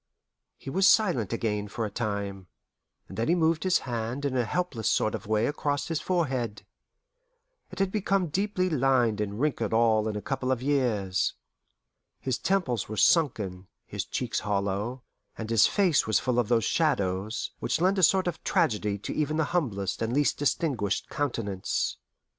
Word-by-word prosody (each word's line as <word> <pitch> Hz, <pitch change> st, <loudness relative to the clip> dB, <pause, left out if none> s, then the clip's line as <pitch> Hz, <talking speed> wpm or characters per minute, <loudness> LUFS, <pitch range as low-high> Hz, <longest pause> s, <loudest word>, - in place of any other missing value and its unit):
He 135 Hz, -, -8 dB
was 190 Hz, +5 st, +5 dB
silent 175 Hz, -, +3 dB
again 105 Hz, -3 st, -1 dB
for 110 Hz, +2 st, -3 dB
a 105 Hz, -, -5 dB
time, 100 Hz, -4 st, -3 dB, 0.6 s
and 95 Hz, -, -8 dB
then 115 Hz, -, 0 dB
he 170 Hz, -, +3 dB
moved 160 Hz, -1 st, +2 dB
his 185 Hz, -1 st, +3 dB
hand 120 Hz, +3 st, -3 dB
in 135 Hz, -2 st, -1 dB
a 125 Hz, -2 st, +1 dB
helpless 140 Hz, -5 st, -1 dB
sort 110 Hz, -, +1 dB
of 110 Hz, -, -5 dB
way 110 Hz, +1 st, +2 dB
across 145 Hz, +1 st, -1 dB
his 165 Hz, -2 st, -1 dB
forehead. 130 Hz, -, -1 dB, 1.0 s
It -, -, -11 dB
had 195 Hz, -1 st, +1 dB
become 195 Hz, -4 st, 0 dB
deeply 190 Hz, +2 st, 0 dB
lined 130 Hz, -, +2 dB
and 105 Hz, 0 st, -3 dB
wrinkled 125 Hz, -7 st, 0 dB
all 110 Hz, -1 st, +3 dB
in 110 Hz, -, -2 dB
a -, -, -2 dB
couple 135 Hz, -1 st, -2 dB
of 130 Hz, -, +1 dB
years. 120 Hz, -9 st, 0 dB, 0.8 s
His 130 Hz, -2 st, -2 dB
temples 135 Hz, -, 0 dB
were 110 Hz, -, -5 dB
sunken, 100 Hz, -, +2 dB, 0.2 s
his -, -, -4 dB
cheeks -, -, -2 dB
hollow, 100 Hz, +5 st, -2 dB, 0.3 s
and 110 Hz, 0 st, -5 dB
his 115 Hz, -3 st, +6 dB
face 185 Hz, -, +2 dB
was 110 Hz, -, +3 dB
full 125 Hz, -2 st, 0 dB
of 120 Hz, -, +1 dB
those 115 Hz, -2 st, +3 dB
shadows 105 Hz, -, 0 dB
which -, -, -1 dB
lend 190 Hz, +3 st, +2 dB
a -, -, +2 dB
sort 190 Hz, +2 st, +4 dB
of 175 Hz, -2 st, -4 dB
tragedy 110 Hz, -, +1 dB
to 100 Hz, -, -5 dB
even 155 Hz, 0 st, -1 dB
the 160 Hz, -, +2 dB
humblest 100 Hz, -, -1 dB
and 115 Hz, +1 st, -1 dB
least 145 Hz, +1 st, +2 dB
distinguished 130 Hz, -, 0 dB
countenance. 115 Hz, -, -2 dB
120 Hz, 170 wpm, -27 LUFS, 105-160 Hz, 1.0 s, his